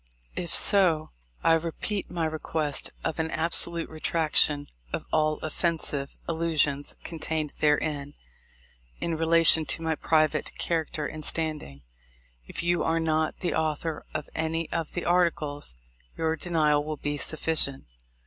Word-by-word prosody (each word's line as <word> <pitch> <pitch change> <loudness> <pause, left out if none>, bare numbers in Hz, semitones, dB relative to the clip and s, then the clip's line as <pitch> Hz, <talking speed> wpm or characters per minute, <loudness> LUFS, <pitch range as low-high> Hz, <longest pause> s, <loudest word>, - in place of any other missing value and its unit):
If 170 - -3
so, 175 -6 +4 0.3
I 165 - +5
repeat 170 +5 -2
my 170 -2 -1
request 155 -2 -1
of 160 - -2
an 160 0 0
absolute 170 +1 +1
retraction 155 -2 +2 0.3
of - - -3
all 155 -1 +2
offensive 155 -3 -2
allusions 155 -4 0
contained 160 -2 -3
therein 150 -1 +1 0.8
in 170 - -1
relation 165 0 +6
to 165 - -2
my 160 0 +1
private 155 -1 +1
character 160 -2 -1
and 155 +1 -6
standing. 150 - -2 0.6
If - - -4
you 175 0 +1
are 165 0 +1
not 155 -1 0
the 175 - 0
author 155 0 -2
of 150 - -4
any 160 0 -2
of 165 -2 -3
the 175 - -3
articles, 155 - +1 0.4
your 160 0 0
denial 155 -4 +2
will 155 0 -4
be 145 +1 -3
sufficient. 155 -2 +2
160 Hz, 130 wpm, -27 LUFS, 150-165 Hz, 0.8 s, relation